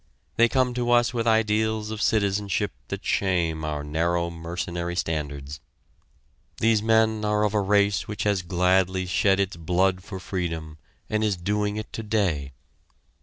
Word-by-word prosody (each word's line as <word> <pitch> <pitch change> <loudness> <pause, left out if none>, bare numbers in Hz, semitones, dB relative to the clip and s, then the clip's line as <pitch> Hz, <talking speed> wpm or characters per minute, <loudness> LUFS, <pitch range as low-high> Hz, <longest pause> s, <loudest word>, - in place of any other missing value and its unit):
They 115 0 +4
come 130 -1 +1
to 120 0 -1
us 120 0 +4
with 115 -1 -1
ideals 110 -1 +1
of 110 0 -4
citizenship 100 -1 +1 0.2
that - - -6
shame 85 -5 0
our 75 -1 -3
narrow, 85 +3 0
mercenary 85 +1 -4
standards. 75 -4 -3 1.0
These 115 -1 +3
men 110 -1 +2
are 105 0 +1
of 105 0 +1
a 105 - +2
race 100 0 +2
which 105 - -4
has 100 -3 +1
gladly 95 +1 +1
shed 95 +2 +2
its 100 -3 -1
blood 90 +2 +1
for 95 -2 -7
freedom 80 -5 -4 0.3
and 110 0 0
is 105 -4 +1
doing 105 +3 -1
it 110 - -6
today. 100 -11 -1
100 Hz, 150 wpm, -25 LUFS, 85-110 Hz, 1.0 s, They